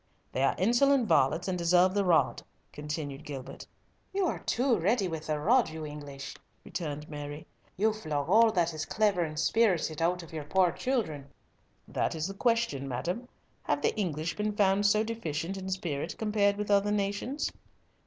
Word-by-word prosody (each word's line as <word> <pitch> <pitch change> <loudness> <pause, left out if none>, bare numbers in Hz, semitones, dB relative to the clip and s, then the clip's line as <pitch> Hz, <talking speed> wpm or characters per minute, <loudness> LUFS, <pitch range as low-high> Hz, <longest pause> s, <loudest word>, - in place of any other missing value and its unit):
"They 130 - -2
are 135 - +3
insolent 240 +5 +3
varlets 160 +1 +3
and 185 - 0
deserve 180 +1 +4
the 200 0 +2
rod," 175 -3 +3 0.3
continued 150 -1 -5
Gilbert. 140 -4 -8 0.5
"You 395 -1 +2
are - - -1
too 245 -3 +1
ready 200 +3 +2
with 160 -2 -5
the 155 -1 -1
rod, 235 - +3
you 160 0 -6
English," 145 -2 -8 0.3
returned 150 -3 -5
Mary. 145 +1 -7 0.3
"You 215 +3 +2
flog 150 -9 -3
all 220 +5 +6
that 170 -4 +1
is 155 0 -3
clever 205 0 +1
and 155 -2 -3
spirited 170 -5 +2
out 175 +1 +1
of 165 - -13
your 155 -2 -5
poor 180 +3 +3
children!" 160 - -2 0.6
"That - - -1
is 155 -1 -2
the 195 - -4
question, 230 - 0
madam. 175 - -3 0.3
Have - - -1
the - - +2
English 170 -6 -2
been 210 0 -1
found 200 0 +3
so 210 +2 +3
deficient 195 -6 -3
in 190 0 -5
spirit 170 -7 -3
compared 210 -2 +2
with 210 0 -2
other 200 0 +3
nations?" 205 +7 -1
180 Hz, 175 wpm, -29 LUFS, 155-210 Hz, 0.6 s, all